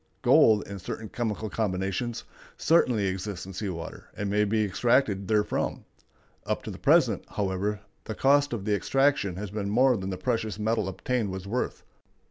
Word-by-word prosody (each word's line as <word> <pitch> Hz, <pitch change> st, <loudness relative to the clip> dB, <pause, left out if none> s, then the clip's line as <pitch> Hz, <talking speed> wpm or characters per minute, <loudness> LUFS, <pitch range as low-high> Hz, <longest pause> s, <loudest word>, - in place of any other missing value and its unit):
Gold, 110 Hz, -2 st, +5 dB
in 100 Hz, -1 st, -7 dB
certain 110 Hz, +4 st, -6 dB
chemical 110 Hz, -2 st, -3 dB
combinations, 100 Hz, +2 st, -2 dB, 0.3 s
certainly 125 Hz, -10 st, +3 dB
exists 95 Hz, 0 st, -3 dB
in 95 Hz, -, -9 dB
sea 100 Hz, +2 st, -3 dB
water, 85 Hz, -2 st, -7 dB
and 100 Hz, -1 st, -2 dB
may 105 Hz, +1 st, +3 dB
be 110 Hz, +1 st, +1 dB
extracted 100 Hz, -1 st, +1 dB
therefrom. 105 Hz, -1 st, 0 dB, 0.6 s
Up -, -, -2 dB
to -, -, -5 dB
the -, -, -9 dB
present, -, -, +3 dB
however, 100 Hz, +1 st, -2 dB, 0.2 s
the 110 Hz, -, -5 dB
cost 145 Hz, +1 st, +3 dB
of 110 Hz, -5 st, -4 dB
the 105 Hz, -, +1 dB
extraction 135 Hz, -3 st, +1 dB
has 100 Hz, +1 st, -6 dB
been 100 Hz, -1 st, -3 dB
more 125 Hz, +4 st, +4 dB
than 95 Hz, -2 st, -4 dB
the 95 Hz, -, -3 dB
precious 110 Hz, -1 st, -1 dB
metal 110 Hz, -1 st, 0 dB
obtained 105 Hz, +4 st, -2 dB
was 95 Hz, 0 st, -6 dB
worth. 120 Hz, +6 st, -3 dB
105 Hz, 170 wpm, -27 LUFS, 95-115 Hz, 0.6 s, Gold